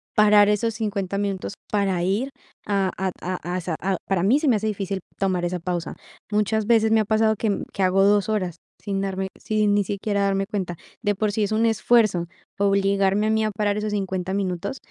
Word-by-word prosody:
parar 210 Hz, -1 st, +6 dB
esos 215 Hz, +2 st, 0 dB
50 200 Hz, -3 st, -2 dB
minutos 200 Hz, -1 st, -2 dB, 0.2 s
para 195 Hz, -4 st, +1 dB
ir 210 Hz, +9 st, 0 dB, 0.4 s
a 195 Hz, -2 st, +1 dB
a 190 Hz, 0 st, -1 dB
a 180 Hz, 0 st, -4 dB
a 185 Hz, -, -2 dB
sa 170 Hz, -1 st, -3 dB
a 190 Hz, 0 st, 0 dB
para 190 Hz, -3 st, +1 dB
mí, 235 Hz, +10 st, +4 dB
se 310 Hz, -, -1 dB
me 250 Hz, -, +5 dB
hace 215 Hz, +1 st, -2 dB
difícil, 195 Hz, -2 st, -2 dB, 0.2 s
tomar 185 Hz, -3 st, 0 dB
esa 180 Hz, 0 st, -2 dB
pausa. 175 Hz, -1 st, -3 dB, 0.4 s
Muchas 210 Hz, +1 st, +1 dB
veces, 220 Hz, -2 st, +4 dB
me 225 Hz, -, +5 dB
ha 215 Hz, -, +1 dB
pasado 220 Hz, +1 st, +2 dB
que 210 Hz, -1 st, -1 dB
que 195 Hz, -, -3 dB
hago 190 Hz, +1 st, +4 dB
2 205 Hz, +1 st, +3 dB
horas 185 Hz, -6 st, -1 dB, 0.2 s
sin 195 Hz, -2 st, -3 dB
darme 190 Hz, -1 st, -2 dB
sin 215 Hz, -1 st, +1 dB
ni 205 Hz, -, +3 dB
siquiera 200 Hz, +1 st, -2 dB
darme 195 Hz, 0 st, +1 dB
cuenta. 190 Hz, -4 st, -3 dB, 0.3 s
De 205 Hz, -3 st, 0 dB
por 210 Hz, +1 st, 0 dB
sí, 215 Hz, +1 st, 0 dB
es 205 Hz, -, -1 dB
un 225 Hz, +1 st, +2 dB
esfuerzo 215 Hz, -5 st, +3 dB, 0.3 s
obligarme 200 Hz, +1 st, +2 dB
a -, -, +1 dB
mí 220 Hz, 0 st, +2 dB
a 215 Hz, -, -1 dB
parar 205 Hz, 0 st, 0 dB
esos 210 Hz, 0 st, -2 dB
50 190 Hz, -2 st, -2 dB
minutos, 195 Hz, +5 st, -2 dB
200 Hz, 210 wpm, -23 LUFS, 190-215 Hz, 0.4 s, parar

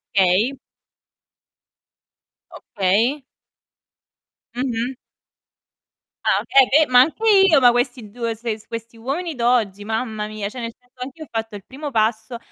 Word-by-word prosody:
Okay. 195 Hz, +7 st, +3 dB, 2.0 s
Okay. 225 Hz, +8 st, 0 dB, 1.3 s
Mh-mh. 245 Hz, 0 st, -2 dB, 1.3 s
Ah -, -, +3 dB
okay, 270 Hz, -2 st, +4 dB
eh 315 Hz, -, +5 dB
be -, -, -18 dB
ma 250 Hz, 0 st, +8 dB
anche 320 Hz, +11 st, 0 dB, 0.3 s
io, 290 Hz, -, +6 dB
ma 245 Hz, -2 st, +6 dB
questi 245 Hz, -2 st, -2 dB
2, 230 Hz, +1 st, -3 dB
se 225 Hz, -1 st, -4 dB
questi 230 Hz, 0 st, -8 dB
uomini 290 Hz, +8 st, -4 dB
d'oggi, 235 Hz, -5 st, +1 dB
mamma 220 Hz, 0 st, -3 dB
mia, 215 Hz, -1 st, -5 dB
cioè, 245 Hz, +4 st, -8 dB
nel 230 Hz, -1 st, -5 dB
senso 250 Hz, 0 st, -22 dB
anch'io 275 Hz, +5 st, -7 dB
ho -, -, -26 dB
fatto 225 Hz, -1 st, -4 dB
il 195 Hz, -, -16 dB
primo 285 Hz, +2 st, -7 dB
passo, 220 Hz, +1 st, 0 dB
235 Hz, 135 wpm, -21 LUFS, 220-260 Hz, 2.0 s, ma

